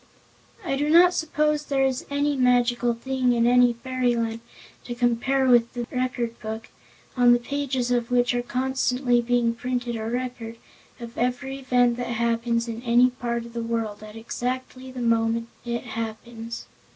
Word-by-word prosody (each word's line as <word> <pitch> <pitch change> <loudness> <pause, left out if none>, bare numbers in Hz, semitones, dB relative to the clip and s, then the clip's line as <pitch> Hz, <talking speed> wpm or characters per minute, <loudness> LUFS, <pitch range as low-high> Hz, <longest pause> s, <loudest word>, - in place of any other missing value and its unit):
I 275 - 0
do 295 +2 0
not 350 +3 +7
suppose 300 -2 0
there 270 -1 +2
is 260 -1 -2
any 285 +1 0
magical 245 -2 +2
thing 255 +1 0
in 235 -1 +2
any 245 0 +5
fairyland 235 -2 -1 0.5
to 240 - -5
compare 245 +3 +1
with 240 -2 +4
the 240 -1 -3
Record 250 -2 -2
Book, 220 0 -6 0.5
on 245 -1 +6
the - - +5
pages 260 -1 -2
of 240 -1 0
which 245 0 +2
are 245 - 0
constantly 250 0 0
being 240 -1 +1
printed 245 0 -3
a 220 0 -3
record 245 -2 -4 0.4
of 235 -1 -8
every 250 +3 -2
event 245 -2 +2
that 245 - -3
happens 235 0 0
in 230 0 -5
any 245 +1 +4
part 235 -1 -3
of 235 - -12
the 235 - -3
world, 230 -2 -3
at 215 0 -11
exactly 255 +3 -5
the 255 -1 -6
moment 230 0 +1 0.2
it 235 0 -3
happens. 230 0 -6
245 Hz, 165 wpm, -25 LUFS, 235-255 Hz, 0.5 s, not